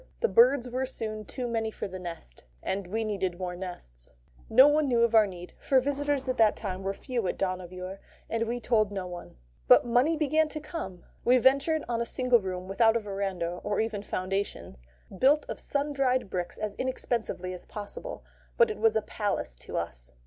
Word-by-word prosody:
The 470 - +4
birds 460 - +5
were 255 +2 -2
soon 215 -4 -5
too 250 +3 -4
many 225 -1 -1
for 220 - -5
the 185 -1 -7
nest, 165 - -8 0.2
and 190 -1 -2
we 220 +4 -1
needed 190 -5 -2
more 180 -1 -4
nests. 175 - -7 0.4
No 265 - +8
one 295 0 +3
knew 240 -3 +3
of 235 -1 +2
our 220 -2 +6
need; 180 -2 -9
for 265 - +3
visitors 285 0 -1
at 255 - -1
that 220 -2 +5
time 190 -3 -4
were 195 0 -1
few 240 -5 -2
at - - -2
Dohnavur, 185 0 -4 0.3
and 230 0 -1
we 240 +1 -2
told 215 -4 +2
no 195 -2 -3
one. 175 - -8 0.3
But - - +7
money 250 +7 +3
began 310 +1 +2
to 305 - -5
come. 240 - -6 0.2
We 250 +1 +5
ventured 275 +5 +3
on 235 -1 -1
a 235 - -1
single 250 -1 +3
room 185 -1 -4
without 225 +3 +4
a - - 0
verandah 195 -4 -3
or 205 -1 -1
even 220 -2 -1
foundations 190 - -3 0.3
built 280 +9 +4
of - - -5
sun 290 +1 -1
dried 255 -6 +1
bricks 180 -1 -3
as 210 -1 -3
inexpensively 235 -7 -2
as 180 - -9
possible. 210 - -7 0.3
But 475 -2 +5
it - - -6
was 225 -1 +3
a 220 - +2
palace 205 - -2
to - - -6
us. 65 -7 -4
220 Hz, 200 wpm, -28 LUFS, 185-260 Hz, 0.4 s, No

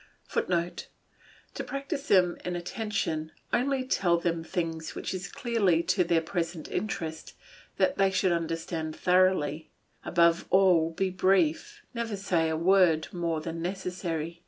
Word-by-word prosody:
[Footnote: 175 -1 -1 0.7
To - - -4
practise 275 +1 -4
them 180 -3 +4
in 180 0 -3
attention, 175 -4 -3 0.2
only 265 +1 +1
tell 175 -8 +2
them 170 -1 -1
things 165 -2 -3
which - - -4
it - - -1
is 180 -1 -6
clearly 225 -11 +1
to 180 +2 +2
their 170 -1 +2
present 165 -1 -3
interest 160 -7 -4 0.4
that 275 -4 +1
they 195 0 +5
should 190 -1 +1
understand 165 -1 -2
thoroughly; 180 -4 +2 0.3
above 170 -1 +3
all 180 -4 +4
be 185 +3 -1
brief, 185 -4 +1
never 230 -3 -3
say 175 -5 +1
a 160 - -1
word 170 -2 +3
more 170 -3 -1
than 165 +1 -5
necessary. 175 -3 -4
175 Hz, 140 wpm, -28 LUFS, 165-190 Hz, 0.7 s, they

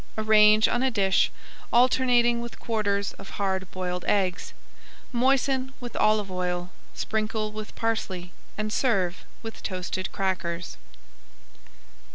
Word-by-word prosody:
Arrange 215 0 +6
on 240 - 0
a 265 - +3
dish, 195 -5 +2 0.4
alternating 240 -1 +4
with 235 0 -8
quarters 205 -3 -1
of 195 - -10
hard 190 -2 -1
boiled 180 -1 -3
eggs. 185 -3 0 0.6
Moisten 265 +1 +1
with 245 -2 -8
olive 215 -2 +2
oil, 180 0 -2 0.2
sprinkle 215 0 -2
with 215 0 -8
parsley, 190 -6 -2 0.3
and 215 0 -2
serve 195 -9 +1 0.2
with 225 0 -7
toasted 185 0 -3
crackers. 180 - -2
215 Hz, 115 wpm, -26 LUFS, 185-235 Hz, 0.6 s, Arrange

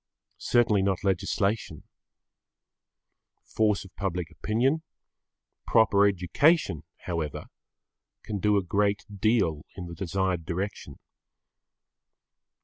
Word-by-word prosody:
Certainly 110 -5 +3
not 95 -1 0
legislation. 100 -2 -1 1.6
Force 105 -3 0
of 95 - -16
public 90 -4 -3
opinion, 120 - 0 0.9
proper 100 -3 +5
education, 100 - +2 0.2
however, 80 -5 -4 0.7
can 105 -2 -4
do 105 +1 +3
a 100 - +1
great 100 +2 0
deal 100 -8 +1
in 90 - -6
the 85 - -8
desired 90 0 -1
direction. 95 +4 -5
100 Hz, 90 wpm, -27 LUFS, 90-105 Hz, 1.6 s, proper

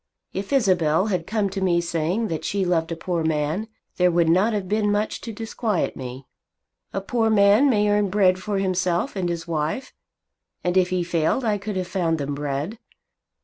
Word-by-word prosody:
If 195 +5 -4
Isabel 185 - +3
had 170 -2 -2
come 210 -1 0
to 195 0 -4
me 175 -2 +3
saying 170 +6 -1
that 160 - -3
she 195 -1 -1
loved 170 -2 0
a - - -1
poor 170 0 -2
man, 160 +6 -1 0.3
there 180 0 +4
would 170 -1 +2
not 190 +7 +4
have 205 -4 -2
been 210 +1 +1
much 210 +1 -1
to 230 - -6
disquiet 220 -2 -2
me. 130 0 -7 0.7
A 195 - -3
poor 225 +2 0
man 210 +5 +5
may 210 -4 +3
earn 205 -1 +2
bread 185 -2 +3
for 200 +1 -2
himself 185 -2 0
and 180 -3 -1
his 170 -1 -4
wife, 160 - -2 0.7
and 180 0 0
if 185 -1 +4
he 185 -1 0
failed 170 +8 0
I 210 -2 +1
could 205 +1 -5
have 185 -1 -1
found 170 -4 0
them 145 -1 -3
bread. 145 +9 -3
185 Hz, 190 wpm, -23 LUFS, 165-205 Hz, 0.7 s, man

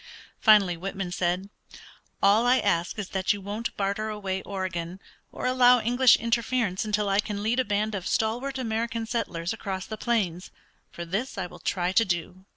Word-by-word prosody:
Finally 205 -5 +5
Whitman 190 +1 -5
said, 180 +2 -1 0.7
"All 210 +4 +5
I 255 +1 +5
ask 170 -5 0
is 205 -3 -4
that 190 0 +1
you 205 - -6
won't 205 +4 -5
barter 200 +2 -1
away 195 -3 -3
Oregon, 185 -2 -4 0.3
or - - -6
allow 250 -1 +5
English 245 +2 +5
interference 230 -3 0
until 210 -1 0
I 195 0 +2
can 205 -1 -2
lead 230 +4 +1
a - - +3
band 210 0 -1
of 190 -3 -4
stalwart 245 +5 -1
American 230 -1 -2
settlers 205 -6 -2
across 195 -4 -5
the 220 - -6
plains: 195 -8 -1 0.4
for 170 - -7
this 200 +10 -3
I 190 - -2
will 180 - -11
try 180 -1 -1
to 225 +4 +4
do." 180 0 -3
205 Hz, 175 wpm, -26 LUFS, 185-230 Hz, 0.7 s, Finally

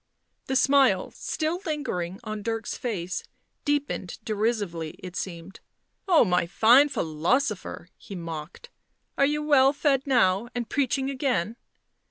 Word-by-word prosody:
The 265 - -1
smile, 265 -8 +4
still 325 +3 -3
lingering 195 - -3
on 215 -1 -5
Dirk's 225 0 -3
face, 185 -7 -3 0.4
deepened 290 - -1
derisively, 210 -7 -2
it 180 -1 -9
seemed. 175 0 -6 0.5
"Oh, 340 -9 +6
my 180 -2 +1
fine 240 +10 +5
philosopher!" 190 - -1
he 200 - -9
mocked. 165 - -7 0.2
" - - -49
Are 275 - +5
you 300 +1 -1
well 280 -2 +5
fed 280 -2 +1
now, 225 -5 +3
and 240 -2 -2
preaching 270 +1 0
again!" 245 - -1
230 Hz, 130 wpm, -26 LUFS, 185-275 Hz, 0.5 s, Oh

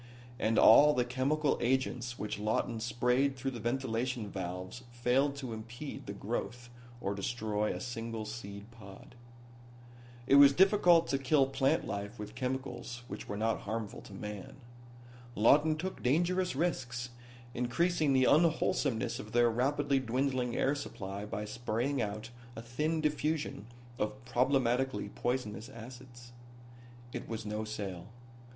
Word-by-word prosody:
And 110 0 +1
all 150 +6 +8
the 125 - +2
chemical 135 +4 +1
agents 125 -1 0
which 105 -1 -4
Lawton 110 +2 -1
sprayed 125 +4 +1
through 135 +2 -2
the 120 - -6
ventilation 120 -2 -2
valves 90 +4 -5
failed 125 +4 +1
to 130 -4 -5
impede 120 +6 -7
the - - -4
growth 120 +3 -4 0.3
or 100 -3 -2
destroy 105 0 -1
a - - -4
single 115 -2 -5
seed 105 -1 -8
pod. 100 -2 -13 1.1
It 140 - +6
was 140 -1 +9
difficult 180 -1 +5
to 135 - +1
kill 135 +1 +3
plant 135 0 +1
life 100 +3 -5
with 105 0 -7
chemicals 125 -1 -4
which - - -7
were 100 - -3
not 110 -3 0
harmful 110 +1 -4
to - - -13
man. 105 -1 -7 0.8
Lawton 150 +8 +5
took 185 +4 -5
dangerous 175 +6 +1
risks, 125 -6 -2 0.4
increasing 155 +5 +1
the 130 -1 +4
unwholesomeness 150 -6 +2
of 105 +1 -9
their 120 -1 +4
rapidly 140 +3 +1
dwindling 130 0 -1
air 135 - +2
supply 100 -8 -5
by 105 0 -4
spraying 120 +5 -1
out 110 +2 -4 0.2
a 115 - -6
thin 155 +7 -1
diffusion 150 -7 -1 0.3
of 120 +4 -3
problematically 125 -3 +1
poisonous 120 -2 -3
acids. 120 +1 -11 0.8
It - - -6
was 110 -1 -4
no 105 +1 -3
sale. 100 -5 -5
120 Hz, 135 wpm, -32 LUFS, 110-135 Hz, 1.1 s, was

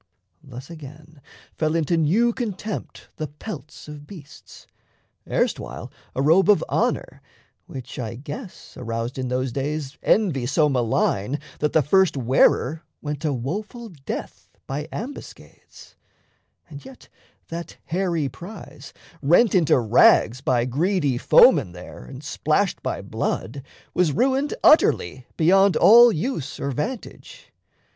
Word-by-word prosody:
Thus, 130 +4 -11
again, 155 0 -12 0.3
Fell 155 0 -1
into 165 +1 +1
new 195 +10 +2
contempt 215 -3 -6
the 155 - -3
pelts 150 - -10
of 150 -1 -10
beasts 160 -8 -13 0.6
Erstwhile - - -2 0.2
a 135 - 0
robe 175 +7 +4
of 205 -6 +5
honour, - - -1 0.5
which, 130 -2 -8
I 115 -2 -4
guess, 175 - -9
Aroused 115 +1 -4
in 130 - -2
those 130 0 -2
days 140 +2 -4
envy 160 - +1
so 150 +3 +2
malign 120 -1 0 0.2
That 150 - -1
the 160 - +4
first 190 +2 +3
wearer 130 +4 +2 0.2
went 150 -1 -4
to 155 - 0
woeful 205 - -5
death 145 -7 -8 0.2
By 145 +3 -5
ambuscades, 265 +6 -10 0.7
and 145 -3 -11
yet 265 -1 -14 0.4
that 170 +1 -7
hairy 170 -4 -1
prize, 150 - -11 0.3
Rent 175 - +4
into 170 -8 +4
rags 120 +1 +4
by 125 -3 +1
greedy 145 0 0
foemen 90 - +5
there 90 -8 -11
And 60 - -11
splashed - - -1
by - - -4
blood, 135 +5 -3 0.3
was 175 -5 +2
ruined 270 - +1
utterly 130 - +3
Beyond 195 +4 +4
all 235 +2 +8
use 160 - -4
or 140 - -2
vantage. 220 - -7
150 Hz, 125 wpm, -23 LUFS, 130-190 Hz, 0.7 s, all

